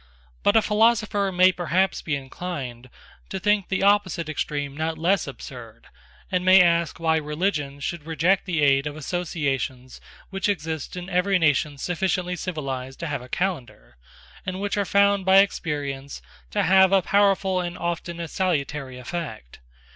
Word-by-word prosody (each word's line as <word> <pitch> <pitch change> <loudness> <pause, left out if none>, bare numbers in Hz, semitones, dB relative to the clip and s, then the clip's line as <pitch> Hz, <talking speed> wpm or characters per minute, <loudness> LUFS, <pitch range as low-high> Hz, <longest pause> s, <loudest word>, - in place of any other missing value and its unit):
But 205 - +3
a 220 - +5
philosopher 210 -2 +2
may 185 +1 +5
perhaps 180 +1 0
be 155 - -2
inclined 135 -4 -6 0.4
to 190 - -4
think 205 -1 +1
the 190 0 0
opposite 195 -5 +2
extreme 145 -2 -3
not 160 +1 -2
less 180 +3 +1
absurd, 115 -3 -10 0.5
and 180 -1 0
may 185 +1 +7
ask 170 -2 +2
why 160 -1 +2
religion 150 -2 -2
should 150 +2 -5
reject 170 +4 +1
the 165 -4 0
aid 140 0 +3
of 145 - -5
associations 140 -6 -3 0.3
which 195 +1 -1
exist 160 -6 -3
in 180 0 -6
every 195 +1 +2
nation 150 -3 +1
sufficiently 180 +3 -1
civilised 135 -7 -5
to - - -3
have 145 -5 -3
a 125 - -12
calendar, 130 - -4 0.5
and 185 0 -4
which 200 0 -2
are 205 -1 0
found 200 0 +3
by 190 +1 +5
experience 145 -8 0 0.3
to - - 0
have 190 +1 +5
a 195 -2 +4
powerful 195 -2 +2
and 175 0 -5
often 170 0 -4
a 170 - -4
salutary 150 -7 -2
effect. 125 - -7
170 Hz, 155 wpm, -24 LUFS, 145-190 Hz, 0.5 s, may